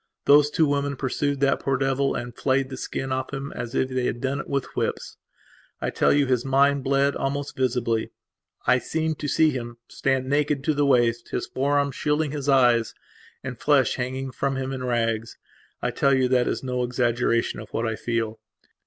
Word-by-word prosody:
Those 145 +1 +6
two 160 +1 +2
women 145 -1 0
pursued 140 +1 -2
that 140 0 +3
poor 135 -1 0
devil 135 +1 0
and 120 -1 -5
flayed 135 0 0
the - - -4
skin 135 +1 -4
off 130 0 -2
him 140 0 -5
as 120 +2 -6
if 130 - +2
they 130 -1 -2
had 120 - -3
done 135 +2 -2
it - - -6
with 140 -2 -2
whips. - - -3 0.6
I - - -2
tell - - +2
you 145 -1 +3
his 125 -2 +1
mind 140 +1 +3
bled 140 +1 +2
almost 140 +1 -3
visibly. 120 -3 0 0.6
I - - +4
seem 160 0 -1
to 150 - -5
see 155 +2 +3
him 120 -3 -6
stand, 135 -1 -1
naked 145 0 +1
to 155 - +1
the 145 -1 +1
waist, 120 -3 +2
his - - -2
forearms 140 +1 0
shielding 150 0 0
his 145 -1 -3
eyes, 120 -4 +4 0.5
and 125 -2 -6
flesh 140 -5 +3
hanging 130 +1 -3
from 135 +1 -1
him 135 0 -3
in 130 -1 -5
rags. 115 -2 -1 0.5
I - - 0
tell 140 -1 +2
you 130 -1 +2
that 125 -1 +3
is - - -2
no 125 -1 -2
exaggeration 120 -1 0
of - - -9
what 115 - -2
I 110 -1 -1
feel. 115 -1 -2
135 Hz, 195 wpm, -24 LUFS, 125-140 Hz, 0.6 s, Those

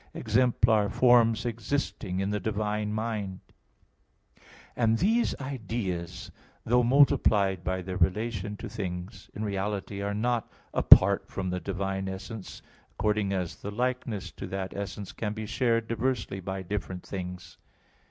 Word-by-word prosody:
exemplar 110 -2 +3
forms 115 -1 +4
existing 115 -5 -2
in 100 +1 -1
the 105 - 0
divine 105 +1 -1
mind 105 -3 -3
(Q. - - -36
15, - - -29 0.3
A. - - -5
1). 115 - +4
And 115 - +3
these 225 - +2
ideas, 110 -10 -4 0.3
though 125 +2 +4
multiplied 115 -8 +4
by 95 +1 -2
their 90 0 -4
relations 105 +2 0
to - - -5
things, 95 -3 -6
in 105 - -3
reality 100 0 -3
are 100 0 -2
not 120 +1 0 0.2
apart 100 +1 +7
from 95 -2 -3
the 90 - -1
divine 95 0 -3
essence, 95 +2 -7 0.3
according 105 -1 0
as 90 -3 -2
the 100 - -6
likeness 120 -2 -2
to - - -7
that 95 -1 -4
essence 100 -1 -5
can 105 -2 -3
be 110 0 -5
shared 115 0 +1
diversely 115 -4 -1
by 95 +1 -4
different 95 -1 -4
things. 90 -2 -7
105 Hz, 145 wpm, -28 LUFS, 95-115 Hz, 0.3 s, apart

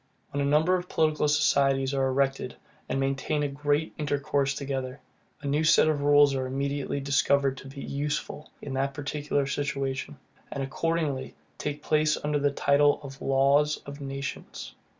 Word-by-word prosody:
When 145 - -1
a 140 - +1
number 155 +5 +3
of 180 -1 -1
political 155 -1 +2
societies 140 -2 +2
are 135 -1 +1
erected, 135 +1 0 0.3
and - - 0
maintain 135 +2 0
a - - +1
great 145 +2 -1
intercourse 140 -1 0
together, 135 -1 -4 0.4
a - - -3
new 145 +3 +1
set 155 0 +5
of 155 -2 +1
rules 145 0 +5
are 130 -1 -1
immediately 140 +1 -2
discovered 140 0 +2
to 135 - -10
be 135 +1 -8
USEFUL 150 +1 -3
in 140 - -5
that 135 +1 -1
particular 145 0 -1
situation; 140 0 -3 0.3
and 140 - -3
accordingly 150 -1 -2 0.2
take 150 0 -4
place 155 0 +2
under 150 0 0
the 145 0 +2
title 140 +1 +3
of 135 -1 -10
Laws 140 +3 +3
of 140 +1 -9
Nations. 135 -1 -6
140 Hz, 160 wpm, -27 LUFS, 135-150 Hz, 0.4 s, set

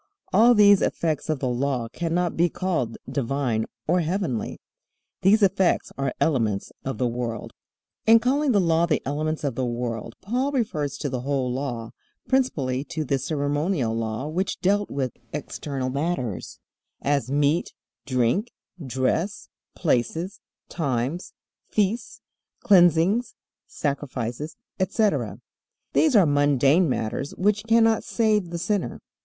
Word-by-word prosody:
All 235 +5 +6
these 205 -2 +7
effects 160 -2 -1
of 155 - +1
the 130 - -2
Law 125 -1 -1
cannot 170 +3 -1
be 175 +1 +3
called 160 -11 -2
divine 130 -4 -1 0.2
or 175 +3 +3
heavenly. 165 - -2 0.6
These 205 +3 +5
effects 190 -1 +2
are 135 -1 -1
elements 115 -10 0
of 135 - -3
the 125 - 0
world. 120 -2 -4 0.5
In 225 +1 +9
calling 270 +5 +2
the 205 - +4
Law 170 -1 +3
the 155 - 0
elements 155 +3 -2
of 140 -3 0
the 130 - -2
world 120 -2 -3
Paul 250 +7 -1
refers 155 - -1
to 145 - -3
the 130 - -2
whole 130 -1 -1
Law, 125 -4 -4 0.4
principally 140 - +1
to 155 +1 -3
the 135 0 0
ceremonial 145 - -1
law 115 +4 -3
which 180 +5 -2
dealt 205 +2 +1
with 130 -3 -2 0.2
external 135 -3 -4
matters, 135 - -3 0.5
as 140 -4 +1
meat, 145 +4 +1 0.4
drink, 130 - +1 0.4
dress, 135 - -1 0.3
places, 165 - 0 0.3
times, 140 +1 -2 0.4
feasts, 210 +3 -1 0.4
cleansings, 180 +4 +4 0.3
sacrifices, 140 -1 -3 0.2
etc. 200 +3 0 0.5
These 305 -6 +4
are 200 -4 +7
mundane 145 +3 +3
matters 125 +3 -2
which 210 +2 +1
cannot 225 -1 +4
save 215 -5 +1
the 170 - -4
sinner. 200 +3 -1
150 Hz, 130 wpm, -25 LUFS, 130-190 Hz, 0.6 s, In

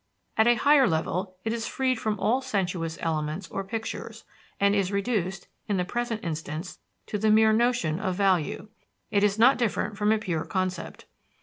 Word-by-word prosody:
At 220 +1 +4
a 240 - +6
higher 280 +1 +5
level, 180 +4 -2
it 225 - -1
is 230 -1 -3
freed 255 -3 0
from 215 -2 -2
all 250 +4 +2
sensuous 180 -9 -2
elements 155 +2 -2
or 195 - -3
pictures, 225 +3 -6 0.4
and 200 0 +4
is 200 -2 +1
reduced, 200 -3 -1 0.2
in 205 - 0
the 180 - 0
present 240 +1 -3
instance, 160 +1 -5 0.3
to 210 - -3
the 220 +1 +2
mere 220 0 +5
notion 225 -9 +1
of 185 -4 -1
value 190 0 +1 0.4
it 200 0 +2
is 205 0 +2
not 250 +5 +5
different 215 -3 -1
from 210 0 +3
a 220 - +4
pure 175 -7 -2
concept. 185 -2 -3
200 Hz, 180 wpm, -27 LUFS, 180-225 Hz, 0.4 s, a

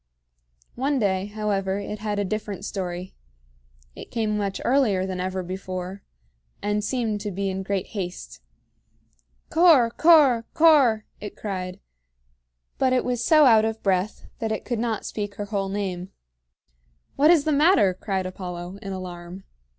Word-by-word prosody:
One 275 +3 0
day, 195 -4 0
however, 205 -2 -1
it 205 +1 -5
had 210 -1 -3
a 205 - 0
different 205 -1 -4
story. 180 -2 -5 0.8
It - - -10
came 220 -2 -1
much 200 -2 -2
earlier 230 -8 +2
than 185 -1 -4
ever 185 0 -2
before, 185 +1 -6 0.6
and 210 0 -1
seemed 220 -3 -1
to 210 - -3
be 195 0 -2
in 190 0 -3
great 195 0 -3
haste. 175 - -6 1.1
"Cor 320 -9 +5
Cor 285 -7 +5
Cor!" 275 -9 +5
it 210 - -8
cried; 185 -2 -5 1.0
but 260 -1 +3
it 255 - +1
was 245 -1 -1
so 310 +1 +6
out 225 -4 +6
of 220 0 -3
breath 190 +1 0
that 225 -1 -2
it 220 - -3
could 240 -3 -2
not 225 -2 -2
speak 205 -1 -4
her 205 - -4
whole 200 -2 -2
name. 190 -2 -3 1.1
"What 295 +3 +4
is 335 -4 +5
the 310 - 0
matter?" 290 - +4
cried 190 0 -3
Apollo, 180 0 -6
in 195 -2 -5
alarm. 180 0 -8
205 Hz, 150 wpm, -24 LUFS, 190-230 Hz, 1.1 s, so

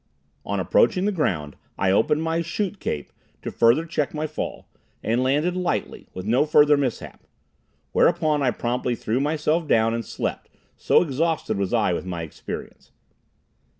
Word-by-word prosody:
On - - -2
approaching 210 - +3
the 210 - +2
ground 85 - -1 0.2
I 95 -1 +2
opened 150 +10 +2
my 165 +1 0
chute 195 +4 -3
cape, 75 - -4 0.3
to - - -4
further 120 +8 +3
check 155 -3 -2
my 155 +1 -1
fall, 155 -1 -5 0.4
and 115 +3 +1
landed 145 +7 +1
lightly, 170 - -2
with 95 - -6
no 120 +6 +3
further 150 -1 +5
mishap. 135 -5 -4 0.6
Whereupon 155 -4 +2
I 130 - +3
promptly 120 +1 -1
threw 115 +2 -1
myself 155 +2 0
down 115 -3 +3
and 115 0 -2
slept, - - -4 0.3
so - - +3
exhausted 160 - -1
was 100 -2 -1
I 105 -6 +2
with 90 - -4
my 85 -2 -4
experience. 80 - -8
145 Hz, 155 wpm, -24 LUFS, 115-160 Hz, 0.6 s, further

